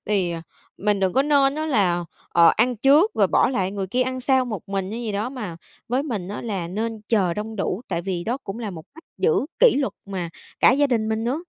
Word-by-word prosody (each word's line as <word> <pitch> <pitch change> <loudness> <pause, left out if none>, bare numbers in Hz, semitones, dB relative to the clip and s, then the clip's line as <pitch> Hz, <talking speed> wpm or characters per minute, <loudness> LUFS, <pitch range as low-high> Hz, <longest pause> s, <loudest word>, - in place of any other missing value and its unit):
Thì, 195 -4 +1
ờ, 165 -1 -5 0.4
mình 205 0 +1
đừng 190 -1 +1
có 270 - +3
nên 280 -1 +3
á 310 +1 -2
là, 185 - +1 0.2
ờ, 170 -1 +6
ăn 240 +2 +2
trước 290 - +5
rồi - - +4
bỏ - - +3
lại 190 -7 -1
người 195 -1 -3
kia 250 +7 +1
ăn 255 0 -3
sau 260 0 +3
một 215 -8 -5
mình 195 -1 -2
hay 230 +3 -4
gì 220 -3 -3
đó, 210 +4 -1
mà 210 -11 -6 0.3
với 255 +3 +1
mình 215 -11 -4
á 205 - -5
là 195 -7 -3
nên 220 +4 -3
chờ 190 -7 +2
đông 220 +1 -5
đủ, 195 +2 -2
tại 170 -2 -2
vì 180 -2 -3
đó 240 +3 -1
cũng 195 +3 -6
là 220 -4 -4
một 160 -2 -9
cách 325 - -14
giữ 445 - +2
kỷ - - +6
luật 270 -9 0
mà 185 -4 -4 0.3
cả - - +7
gia 285 +2 +3
đình 225 -5 0
mình 220 0 -1
nữa. 275 +8 -1
220 Hz, 250 wpm, -23 LUFS, 190-260 Hz, 0.4 s, cả